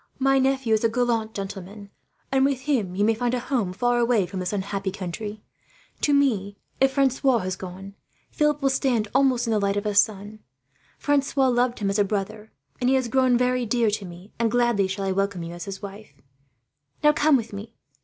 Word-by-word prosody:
My 270 Hz, 0 st, +3 dB
nephew 265 Hz, -3 st, +1 dB
is 220 Hz, -, +2 dB
a 230 Hz, -, +4 dB
gallant 230 Hz, -2 st, -1 dB
gentleman, 200 Hz, +1 st, -7 dB, 0.4 s
and 265 Hz, 0 st, +3 dB
with 275 Hz, -2 st, +1 dB
him 245 Hz, -11 st, -1 dB
you 205 Hz, +2 st, +2 dB
may 225 Hz, -, +3 dB
find 245 Hz, +2 st, -1 dB
a -, -, -1 dB
home 245 Hz, -6 st, -1 dB
far 245 Hz, +6 st, +1 dB
away 235 Hz, -5 st, +2 dB
from 190 Hz, +1 st, -6 dB
this 180 Hz, -1 st, -2 dB
unhappy 195 Hz, -1 st, -2 dB
country. 205 Hz, +3 st, -6 dB, 0.6 s
To 295 Hz, -, +2 dB
me, 215 Hz, -9 st, +1 dB, 0.2 s
if 270 Hz, 0 st, +3 dB
Francois 265 Hz, -1 st, +2 dB
has 185 Hz, -3 st, -3 dB
gone, 190 Hz, +1 st, -9 dB, 0.4 s
Philip 300 Hz, -1 st, +1 dB
will 270 Hz, -, +3 dB
stand 245 Hz, -6 st, 0 dB
almost 255 Hz, -3 st, +3 dB
in 230 Hz, -, -1 dB
the 215 Hz, -, +2 dB
light 200 Hz, 0 st, 0 dB
of 205 Hz, -, -2 dB
a 210 Hz, -, 0 dB
son. 205 Hz, +1 st, +1 dB, 0.6 s
Francois 275 Hz, -2 st, +1 dB
loved 245 Hz, 0 st, +1 dB
him 200 Hz, -2 st, -1 dB
as 200 Hz, -, -1 dB
a -, -, +5 dB
brother, 205 Hz, +2 st, -4 dB, 0.3 s
and 250 Hz, -, +1 dB
he 265 Hz, -, +4 dB
has 260 Hz, -3 st, 0 dB
grown 255 Hz, -1 st, +3 dB
very 250 Hz, 0 st, +1 dB
dear 235 Hz, -1 st, +1 dB
to 205 Hz, -1 st, -3 dB
me, 180 Hz, +3 st, -12 dB
and 230 Hz, -1 st, +2 dB
gladly 240 Hz, -4 st, +2 dB
shall 195 Hz, +1 st, -3 dB
I 190 Hz, -, 0 dB
welcome 195 Hz, -2 st, -1 dB
you 165 Hz, +1 st, -7 dB
as 175 Hz, -1 st, -7 dB
his 195 Hz, 0 st, -7 dB
wife. 200 Hz, +2 st, -10 dB, 0.9 s
"Now, 300 Hz, 0 st, +6 dB
come 300 Hz, -1 st, +4 dB
with 230 Hz, -3 st, -6 dB
me. 210 Hz, +3 st, -8 dB
220 Hz, 210 wpm, -24 LUFS, 200-255 Hz, 0.9 s, Now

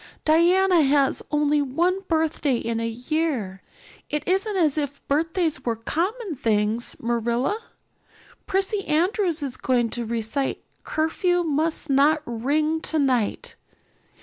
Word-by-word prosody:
"Diana 350 Hz, +3 st, +4 dB
has 280 Hz, -1 st, +2 dB
only 295 Hz, 0 st, +2 dB
one 340 Hz, +8 st, 0 dB
birthday 315 Hz, -4 st, +1 dB
in 230 Hz, 0 st, -2 dB
a 230 Hz, -, -1 dB
year. 245 Hz, -, -2 dB, 0.5 s
It 295 Hz, 0 st, -3 dB
isn't 390 Hz, +3 st, +1 dB
as 310 Hz, -6 st, +2 dB
if 285 Hz, -2 st, -4 dB
birthdays 320 Hz, -1 st, 0 dB
were 235 Hz, -2 st, -1 dB
common 350 Hz, -, -3 dB
things, 220 Hz, +1 st, 0 dB
Marilla. 240 Hz, -, -1 dB, 0.9 s
Prissy 390 Hz, +1 st, 0 dB
Andrews 345 Hz, 0 st, +1 dB
is 265 Hz, -3 st, -4 dB
going 240 Hz, -3 st, +1 dB
to 240 Hz, -, -2 dB
recite 235 Hz, +4 st, -2 dB, 0.2 s
'Curfew 350 Hz, +3 st, 0 dB
Must 315 Hz, 0 st, -1 dB
Not 295 Hz, +3 st, +4 dB
Ring 300 Hz, +7 st, 0 dB
Tonight. 265 Hz, -10 st, 0 dB
295 Hz, 120 wpm, -24 LUFS, 245-330 Hz, 0.9 s, Diana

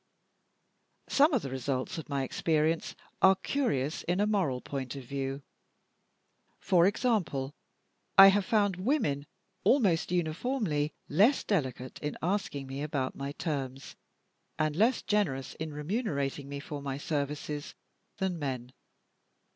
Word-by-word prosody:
Some 295 Hz, +4 st, +5 dB
of 255 Hz, -7 st, +1 dB
the 135 Hz, -, -5 dB
results 130 Hz, +3 st, -2 dB
of 155 Hz, -, -9 dB
my 140 Hz, -2 st, 0 dB
experience 160 Hz, +4 st, 0 dB, 0.3 s
are 190 Hz, 0 st, +7 dB
curious 165 Hz, -, -1 dB
in 180 Hz, +2 st, -1 dB
a 205 Hz, -, +4 dB
moral 185 Hz, -12 st, +1 dB
point 135 Hz, 0 st, -5 dB
of 135 Hz, -, -7 dB
view. 135 Hz, +1 st, -4 dB, 1.2 s
For 175 Hz, -1 st, +4 dB
example, 195 Hz, -, 0 dB, 0.6 s
I 195 Hz, 0 st, +12 dB
have 200 Hz, +1 st, +3 dB
found 205 Hz, -3 st, +2 dB
women 180 Hz, -, 0 dB, 0.4 s
almost 195 Hz, -, +3 dB
uniformly 170 Hz, -, 0 dB, 0.2 s
less 210 Hz, -, +4 dB
delicate 130 Hz, -, -2 dB
in 150 Hz, 0 st, -4 dB
asking 175 Hz, -7 st, -1 dB
me 135 Hz, +1 st, -5 dB
about 140 Hz, -3 st, -2 dB
my 140 Hz, +1 st, -4 dB
terms, 135 Hz, -4 st, -4 dB, 0.6 s
and 155 Hz, -1 st, 0 dB
less 225 Hz, +7 st, +3 dB
generous 150 Hz, -12 st, 0 dB
in 160 Hz, 0 st, -3 dB
remunerating 145 Hz, -, -2 dB
me 140 Hz, 0 st, -4 dB
for 145 Hz, 0 st, -6 dB
my 135 Hz, -1 st, -3 dB
services, 145 Hz, 0 st, -3 dB, 0.4 s
than 190 Hz, -3 st, -1 dB
men. 130 Hz, -3 st, -4 dB
150 Hz, 130 wpm, -30 LUFS, 140-195 Hz, 1.2 s, I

